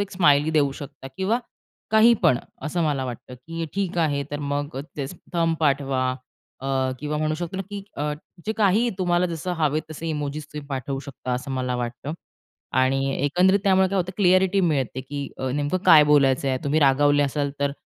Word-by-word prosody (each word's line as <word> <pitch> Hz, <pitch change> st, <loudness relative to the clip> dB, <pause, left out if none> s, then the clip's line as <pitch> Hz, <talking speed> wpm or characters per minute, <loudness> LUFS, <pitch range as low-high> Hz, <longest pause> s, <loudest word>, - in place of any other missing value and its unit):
एक 200 Hz, -1 st, -2 dB
स्माईल 150 Hz, -4 st, +4 dB
देऊ 145 Hz, -3 st, +3 dB
शकता 140 Hz, -2 st, -9 dB
किंवा 195 Hz, +5 st, +1 dB, 0.5 s
काही 220 Hz, +2 st, +6 dB
पण 125 Hz, -, +4 dB, 0.2 s
असं 170 Hz, +2 st, -1 dB
मला 145 Hz, -4 st, 0 dB
वाटतं, 125 Hz, 0 st, -7 dB
की 165 Hz, +6 st, -6 dB
ठीक 190 Hz, -3 st, -1 dB
आहे, 145 Hz, -3 st, +1 dB
तर 145 Hz, -, -3 dB
मग 145 Hz, -1 st, -3 dB
अ, -, -, -2 dB, 0.2 s
तेच 145 Hz, +4 st, -4 dB, 0.2 s
थंब 165 Hz, -1 st, +2 dB
पाठवा 135 Hz, -3 st, +1 dB, 0.5 s
अ, 135 Hz, -, -6 dB, 0.3 s
किंवा 150 Hz, +1 st, -2 dB
म्हणू 155 Hz, 0 st, 0 dB
शकतो 175 Hz, +3 st, -5 dB
ना, 195 Hz, -, -2 dB
की 205 Hz, -1 st, -5 dB
अ, 150 Hz, +1 st, -1 dB, 0.3 s
जे 220 Hz, -, +1 dB
काहीही 215 Hz, +2 st, +3 dB
तुम्हाला 175 Hz, 0 st, +2 dB
जसं 170 Hz, +1 st, -4 dB
हवे 155 Hz, -1 st, +1 dB
तसे 160 Hz, +2 st, -6 dB
इमोजीस 150 Hz, -1 st, -3 dB
तुम्ही 150 Hz, -1 st, -7 dB
पाठवू 135 Hz, 0 st, -3 dB
शकता 130 Hz, -2 st, -6 dB
असं 125 Hz, +3 st, -3 dB
मला 125 Hz, -1 st, -1 dB
वाटतं 120 Hz, +4 st, -4 dB, 0.7 s
आणि 130 Hz, +1 st, +3 dB, 0.3 s
एकंदरीत 180 Hz, +7 st, +4 dB
त्यामुळे 190 Hz, -1 st, +4 dB
काय 195 Hz, -, -2 dB
होतं 185 Hz, 0 st, -1 dB
क्लिअ‍ॅरिटी 190 Hz, 0 st, +4 dB
मिळते, 140 Hz, -7 st, 0 dB
की 140 Hz, +2 st, -5 dB
अ, 130 Hz, -, -2 dB
नेमकं 145 Hz, +6 st, 0 dB
काय 155 Hz, -2 st, +9 dB
बोलायचंय. 135 Hz, -2 st, +3 dB
तुम्ही 145 Hz, +2 st, +2 dB
रागावले 145 Hz, +1 st, +4 dB
असाल, 140 Hz, 0 st, -1 dB
तर 140 Hz, 0 st, +1 dB
150 Hz, 185 wpm, -24 LUFS, 135-175 Hz, 0.7 s, काय